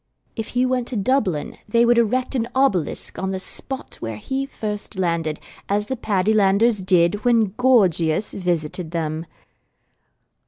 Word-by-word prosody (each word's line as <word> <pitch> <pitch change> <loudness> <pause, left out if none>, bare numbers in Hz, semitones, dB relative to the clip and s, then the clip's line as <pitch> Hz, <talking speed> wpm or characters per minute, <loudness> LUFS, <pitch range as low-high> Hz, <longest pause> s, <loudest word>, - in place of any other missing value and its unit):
If 225 -2 -4
he 250 - +4
went 255 -1 0
to 255 - -4
Dublin 200 - 0
they 235 +2 +4
would 240 0 +4
erect 250 +4 +1
an 235 -3 0
obelisk 235 - 0
on 190 - -2
the 190 -1 -2
spot 260 +7 -5
where 115 -2 -5
he 270 - -3
first 210 -5 -5
landed, 165 -4 -1 0.3
as 205 +1 +1
the 260 - -3
Paddylanders 210 0 +2
did 185 +2 +3
when 230 -5 +3
Gorgius 205 -8 +2
visited 175 -2 -2
them. 160 -1 -3
205 Hz, 145 wpm, -22 LUFS, 175-240 Hz, 0.3 s, he